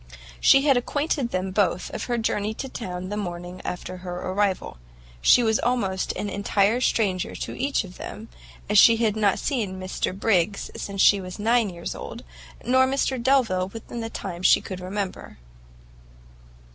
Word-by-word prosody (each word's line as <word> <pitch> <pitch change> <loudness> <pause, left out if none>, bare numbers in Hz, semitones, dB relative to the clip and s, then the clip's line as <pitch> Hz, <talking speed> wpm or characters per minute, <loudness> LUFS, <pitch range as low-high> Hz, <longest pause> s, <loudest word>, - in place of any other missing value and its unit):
She 275 - +6
had 275 -4 +5
acquainted 285 0 -1
them 185 -2 -2
both 185 -3 0
of - - -4
her 240 -1 -1
journey 215 -1 -1
to 270 - -5
town 185 -7 -6
the 205 - -3
morning 175 -2 -5
after 185 +1 -5
her 180 -1 -6
arrival. 190 - -1 0.4
She 245 - +6
was 220 -1 +2
almost 205 -7 0
an 205 - -4
entire 200 +3 +1
stranger 195 -7 0
to - - -5
each 275 -1 0
of 185 -1 -12
them, 220 +2 -8 0.4
as 210 0 +5
she 230 +2 +7
had 220 -2 +1
not 205 -3 +2
seen 210 -9 -2
Mr 185 0 -3
Briggs 200 -2 +1
since 200 -1 -1
she 200 -2 +6
was 185 -1 -8
nine 225 0 +2
years 170 -2 -6
old, - - -8 0.4
nor 260 +2 +4
Mr 265 -1 0
Delvile 235 -8 +2
within 225 +3 -8
the 225 0 -4
time 180 -5 -6
she - - +6
could 185 -2 -7
remember. 190 +1 -5
205 Hz, 170 wpm, -24 LUFS, 185-235 Hz, 0.4 s, she